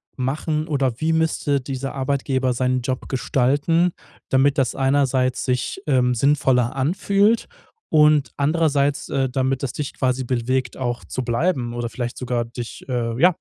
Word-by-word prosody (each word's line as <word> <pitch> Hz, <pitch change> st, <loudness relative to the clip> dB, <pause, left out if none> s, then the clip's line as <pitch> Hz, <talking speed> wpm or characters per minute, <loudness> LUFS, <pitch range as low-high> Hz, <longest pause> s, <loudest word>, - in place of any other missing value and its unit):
machen 150 Hz, +4 st, -2 dB
oder 135 Hz, -6 st, 0 dB
wie 160 Hz, +1 st, +2 dB
müsste 160 Hz, -3 st, +1 dB
dieser 135 Hz, +1 st, -5 dB
Arbeitgeber 130 Hz, -1 st, 0 dB
seinen 125 Hz, +1 st, 0 dB
Job 130 Hz, +1 st, -4 dB
gestalten, 140 Hz, +7 st, +1 dB, 0.4 s
damit 140 Hz, +2 st, +3 dB
das 135 Hz, -2 st, +1 dB
einerseits 135 Hz, -2 st, +1 dB
sich, 125 Hz, +8 st, -2 dB
ähm, 125 Hz, -3 st, +3 dB
sinnvoller 130 Hz, -2 st, +2 dB
anfühlt 200 Hz, -, +2 dB, 0.4 s
und 150 Hz, -5 st, +4 dB
andererseits, 145 Hz, -1 st, +1 dB
äh, 135 Hz, -1 st, +1 dB
damit 130 Hz, +1 st, -1 dB
das 130 Hz, -, -2 dB
dich 145 Hz, -2 st, -4 dB
quasi 130 Hz, 0 st, 0 dB
bewegt 125 Hz, +1 st, -1 dB
auch 120 Hz, -2 st, -3 dB
zu 130 Hz, -, -4 dB
bleiben 120 Hz, 0 st, 0 dB
oder 120 Hz, -1 st, -3 dB
vielleicht 120 Hz, 0 st, -5 dB
sogar 120 Hz, -2 st, -2 dB
dich, 120 Hz, 0 st, -8 dB
äh, 120 Hz, -2 st, -2 dB
ja, 175 Hz, +3 st, +5 dB
130 Hz, 150 wpm, -22 LUFS, 125-145 Hz, 0.4 s, ja